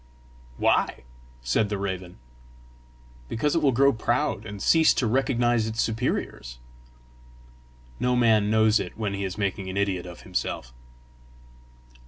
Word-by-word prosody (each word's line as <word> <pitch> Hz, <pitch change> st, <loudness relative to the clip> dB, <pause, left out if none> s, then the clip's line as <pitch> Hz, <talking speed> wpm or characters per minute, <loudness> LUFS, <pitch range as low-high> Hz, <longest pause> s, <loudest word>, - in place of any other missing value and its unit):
"Why?" -, -, +1 dB, 0.4 s
said 105 Hz, -, +1 dB
the 105 Hz, -, -2 dB
raven. 95 Hz, -2 st, -5 dB, 1.1 s
"Because 145 Hz, +6 st, 0 dB
it 165 Hz, -, +2 dB
will 140 Hz, -3 st, +4 dB
grow 140 Hz, +3 st, +4 dB
proud, 120 Hz, -1 st, -1 dB
and 105 Hz, -1 st, -7 dB
cease 160 Hz, +9 st, +4 dB
to 125 Hz, -, 0 dB
recognise 120 Hz, -2 st, +1 dB
its 110 Hz, +1 st, -5 dB
superiors." 110 Hz, -, -2 dB, 1.4 s
No 125 Hz, 0 st, +1 dB
man 110 Hz, -4 st, +3 dB
knows 110 Hz, 0 st, +4 dB
it -, -, -6 dB
when 105 Hz, -3 st, -2 dB
he 100 Hz, 0 st, -3 dB
is 95 Hz, 0 st, -4 dB
making 100 Hz, -2 st, -2 dB
an 95 Hz, -, -5 dB
idiot 95 Hz, -3 st, -1 dB
of 85 Hz, -1 st, -10 dB
himself. 65 Hz, -8 st, -4 dB
110 Hz, 135 wpm, -25 LUFS, 95-120 Hz, 1.4 s, will